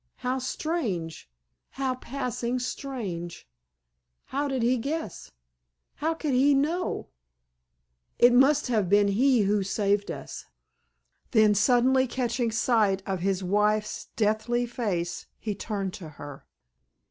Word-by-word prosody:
How 255 +1 -2
strange—how 180 - -4
passing 250 -1 -3
strange! 220 - -5 0.8
How 285 +2 -2
did 265 -3 -1
he 245 +1 +2
guess—how 60 - -6
could 305 -4 -2
he 275 +3 +4
know—it 320 +6 0 1.3
must 270 +4 +5
have 215 -7 0
been 205 0 +4
he 245 +4 +3
who 205 +1 +2
saved 200 +1 0
us!" - - -7 0.8
Then 215 -2 +5
suddenly 250 +5 +3
catching 240 -1 -1
sight 215 -4 +2
of 190 -2 -2
his 190 +1 -1
wife's 210 +3 0
deathly 220 +3 +1
face 200 -8 -3
he 215 - -3
turned 195 -2 -4
to 170 -6 -8
her. 145 -2 -11
220 Hz, 110 wpm, -27 LUFS, 195-255 Hz, 1.3 s, must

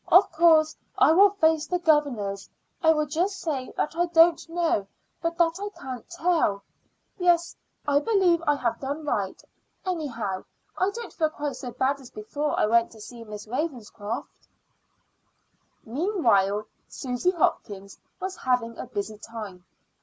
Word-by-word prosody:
"Of 370 +3 +7
course 320 -1 +5 0.2
I - - +6
will 395 +5 +7
face 320 -6 +2
the 360 - 0
governors. 275 - +1 0.3
I 320 -3 +6
will 305 -1 +2
just 350 +7 -1
say 275 -6 -3
that 305 - -1
I 345 +1 +1 0.5
know 265 - +1 0.3
but 335 0 -2
that 340 +1 +2
I 410 +1 -3
can't 255 -3 -7
tell. 335 - +1 0.6
Yes, 345 -1 +2 0.3
I 285 0 +4
believe 365 -3 +3
I 295 - +4
have 245 -4 -1
done 285 +3 -4
right. 200 -9 -1 0.5
Anyhow, 235 - -3 0.3
I 370 - +1
don't 465 +3 -7
feel 315 -2 +1
quite 295 -2 -4
so 250 - -6
bad 270 +3 0
as 260 -3 -12
before 285 +8 -3
I - - +4
went 230 +2 +3
to 220 - -14
see 230 +2 -10
Miss 210 -1 -8
Ravenscroft." 240 -4 -5 1.4
Meanwhile 225 - +2 0.2
Susy 250 +6 -1
Hopkins 200 - -1 0.2
was 380 0 -4
having 245 -3 0
a - - -5
busy 205 +1 -5
time. 210 -6 -8
290 Hz, 145 wpm, -26 LUFS, 225-335 Hz, 1.4 s, Of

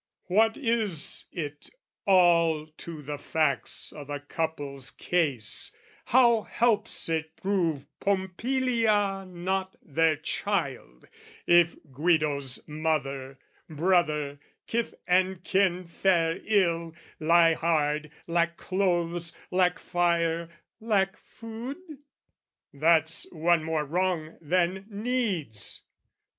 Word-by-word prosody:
What 220 +5 +3
is 225 - 0
it 145 -4 -6 0.4
all 170 -4 +4
to 155 0 -9
the 145 0 -5
facts 155 -2 -1
o' 150 - -8
the 145 0 -5
couple's 145 -3 -4
case, 145 -11 -1 0.3
How 235 -2 +5
helps 225 0 0
it 160 -1 -2
prove 170 -8 0
Pompilia 205 0 +1
not 185 +1 -2
their 160 +1 +2
child, 145 - -3 0.4
If 175 -1 +5 0.2
Guido's 145 -3 0
mother, 140 -4 -2 0.3
brother, 150 -3 +1 0.3
kith 235 0 -2
and 185 0 +2
kin 185 -2 +1
Fare 170 -1 +1
ill, 170 -6 +1 0.2
lie 165 +1 +5
hard, 150 -2 0 0.2
lack 170 0 0
clothes, 175 -3 0 0.2
lack 180 -1 +3
fire, 170 -2 0 0.3
lack 205 -3 +1
food? 230 +6 -8 1.0
That's 160 +2 +2
one 165 0 +2
more 160 -1 -1
wrong 170 0 -1
than 180 +4 0
needs. 205 - -2
170 Hz, 95 wpm, -27 LUFS, 155-190 Hz, 1.0 s, How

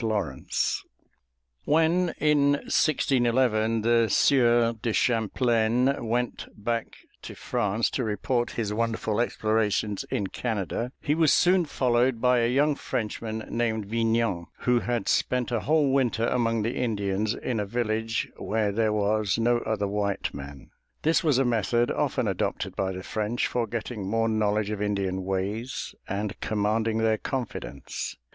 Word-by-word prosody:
LAWRENCE 100 - -1 0.8
When 165 +3 +2
in 145 -2 +3
1611 120 -6 +2
the 115 0 +3
Sieur 120 -3 +4
de 115 - -1
Champlain 120 +2 +2
went 120 +1 -2
back 115 +2 -3 0.3
to - - -9
France 110 -2 -1
to 130 - -1
report 120 +3 -1
his 105 -3 -1
wonderful 115 0 0
explorations 110 -3 0
in 100 - -1
Canada, 115 +3 -3
he 145 - +1
was 160 -2 +3
soon 180 0 +4
followed 125 -3 +1
by 125 0 +3
a 115 0 +2
young 145 +3 +3
Frenchman 110 -3 -4
named 110 -3 -1
Vignan, 115 -4 0
who 125 -1 +3
had 120 -3 -2
spent 125 -1 +1
a 120 - +1
whole 150 +2 +2
winter 120 -4 +1
among 115 -2 +1
the 115 +3 -2
Indians, 105 -2 -1
in 120 -4 -3
a 105 - -1
village 115 0 -1
where 110 -1 0
there 110 +1 +1
was 105 -1 +1
no 120 +1 +2
other 110 -3 -1
white 100 0 -2
man. 70 0 -9 0.3
This 160 +4 +3
was 150 -6 +3
a 135 - +3
method 120 0 +1
often - - 0
adopted - - -2
by 95 -1 -1
the 95 0 -6
French 110 +4 -1
for 120 -2 -1
getting 110 -2 -4
more 115 +1 +1
knowledge 105 -1 0
of 105 -1 -3
Indian 100 -2 -1
ways 100 +6 -3 0.2
and 100 +1 -3
commanding 110 +1 0
their 110 -1 +2
confidence. 130 -5 -5
115 Hz, 145 wpm, -26 LUFS, 105-120 Hz, 0.8 s, Sieur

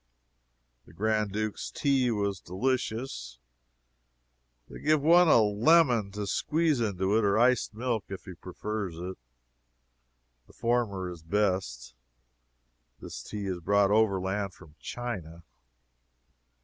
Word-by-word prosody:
The - - -16
Grand 105 +2 0
Duke's 110 +1 -3
tea 135 -3 +1
was 100 -4 -1
delicious. 110 - -3 1.3
They - - -10
give 155 0 +3
one 170 +4 +6
a 135 - +6
lemon 115 +1 +4
to 105 0 -3
squeeze 155 - +1
into 100 -2 0
it, 110 - +3
or 100 0 +2
iced 120 -2 +2
milk, 115 -2 -2
if 95 -1 -7
he 95 - -8
prefers 95 +1 -5
it. 90 +2 -6 1.3
The - - -19
former 115 -6 -1
is 85 -2 -10
best. 90 -8 -1 1.1
This - - -8
tea 105 - -6
is 95 -2 -3
brought 100 +3 +2
overland 100 -2 +1
from 75 - -16
China. 90 -9 -6
105 Hz, 120 wpm, -28 LUFS, 95-120 Hz, 1.3 s, one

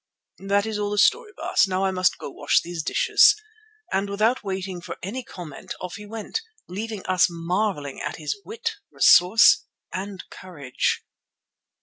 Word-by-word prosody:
"That 200 +1 +1
is 220 -1 -3
all 205 0 -1
the 205 - -3
story, 455 - +3
Baas. - - +2
Now 190 0 0
I 190 - +1
must 185 0 +1
go - - -7
to - - -15
wash 145 - +2
those 170 -1 -4
dishes," 430 - +4 0.5
and 195 +1 0
without 220 +6 +1
waiting 190 -2 -4
for - - -7
any 235 +8 -4
comment 170 -9 -9
off 180 -1 -6
he 210 0 -10
went, 225 - -4 0.3
leaving 210 +2 -5
us 185 -1 +4
marvelling 170 -3 -2
at - - -4
his 150 -3 -3
wit, 460 +2 -4
resource 180 +6 +6 0.3
and 195 0 -5
courage. 145 -9 -3
195 Hz, 160 wpm, -24 LUFS, 180-215 Hz, 0.5 s, resource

